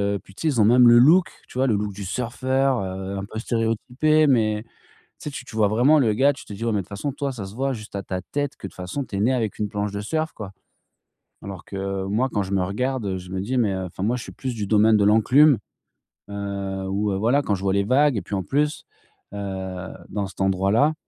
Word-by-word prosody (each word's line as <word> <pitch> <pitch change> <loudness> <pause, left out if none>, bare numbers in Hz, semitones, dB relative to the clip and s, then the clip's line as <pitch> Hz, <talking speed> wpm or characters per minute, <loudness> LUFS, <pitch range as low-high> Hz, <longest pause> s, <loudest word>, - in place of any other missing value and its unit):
et - - -3
puis 100 - -18
tu - - -11
sais? 145 - -1
Ils 115 - +1
ont 105 - +5
même 120 +2 +6
le 120 - +8
look, 165 +8 +6 0.2
tu - - -10
vois? 135 - +3
Le 115 - +2
look 105 0 -2
du 100 +1 -7
surfeur, 130 +4 0
heu, 95 +1 -5
un 95 - -5
peu 110 - -6
stéréotypé 125 +7 +1
mais 110 -5 +2
tu - - -31 0.5
sais? - - -5
Tu 130 - -7
tu 110 - -11
vois? 110 -2 +3
Vraiment 125 +9 +4
le 115 -6 +3
gars 135 +6 +4
tu 140 - -12
te 105 - -9
dis: 105 - -7
«Ouais - - +1
toi, - - -1
de 100 -2 0
toute - - -23
façon, 105 +8 -3
toi 140 0 -3
ça 110 -6 -6
se 95 +2 -10
voit 135 +2 -1
juste 105 -4 -9
à 100 - -3
ta 95 -1 -4
tête 145 +7 -3
que, - - -7
de - - -13
toute - - -21
façon, 95 +10 -4
tu 100 - -7
es - - -1
né 120 +5 +3
avec 115 -5 -1
une 105 - 0
planche 105 0 -2
de 100 0 -4
surf 155 +9 -2
quoi». 100 -3 -8 0.9
Alors 95 -3 -8
que 95 -1 -4
moi 110 +7 0
quand 105 - 0
je 95 +1 -5
me 95 -1 +2
regarde, 105 0 -2
je 90 0 -10
me 95 - -2
dis: 125 +7 -2
«Mais 105 -6 +1
enfin 95 0 -5
moi, 115 +4 +1
je 120 - -7
suis - - -9
plus 130 -2 -4
du 105 -2 -3
domaine 110 +1 +4
de 105 - +3
l'enclume» 125 +7 +5 0.7
heu, 100 -1 -4
où 100 +2 0
heu, 95 - -1
voilà 120 +8 +2
quand 105 - 0
je 95 - -7
vois 95 -1 +1
les 100 0 +2
vagues, 135 +3 +3
et - - -1
puis 100 - -4
en 95 - -2
plus, 150 - 0 0.5
heu, 95 -2 -5 0.2
dans 100 0 -2
cet 95 - -9
endroit 95 0 +1
là 145 +8 +4
105 Hz, 270 wpm, -23 LUFS, 100-130 Hz, 0.9 s, le